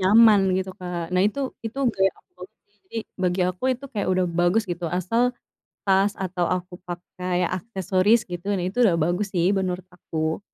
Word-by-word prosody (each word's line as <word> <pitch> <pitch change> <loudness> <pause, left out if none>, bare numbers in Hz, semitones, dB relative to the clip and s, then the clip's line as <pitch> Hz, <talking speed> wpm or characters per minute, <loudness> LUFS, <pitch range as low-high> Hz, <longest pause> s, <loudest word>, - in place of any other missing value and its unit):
nyaman 210 +2 +7 0.2
gitu 190 0 -2
Kak. 180 -1 -4
Nah 185 - +3
itu 280 +7 -2 0.3
itu 230 +5 -6
gaya 195 0 +3
aku - - -26
banget - - -9
sih, 410 - -39
jadi 230 -11 -6 0.2
bagi 180 0 +1
aku 185 +7 -5
itu 275 - -13
kayak 205 -3 -1
udah 185 0 +2
bagus 175 +6 +3
gitu, 175 -2 -4
asal 185 +7 0 0.6
tas 195 +1 +3
atau 180 -2 -2
aku 180 0 -2
pakai 180 0 -3
aksesoris 190 +2 +2
gitu, 175 +1 -6
nah 180 - -1
itu 205 - -7
udah 185 - +3
bagus 175 +5 +1
sih 175 +1 +3
menurut 185 -1 -1
aku. 160 -1 -3
185 Hz, 180 wpm, -24 LUFS, 180-205 Hz, 0.6 s, nyaman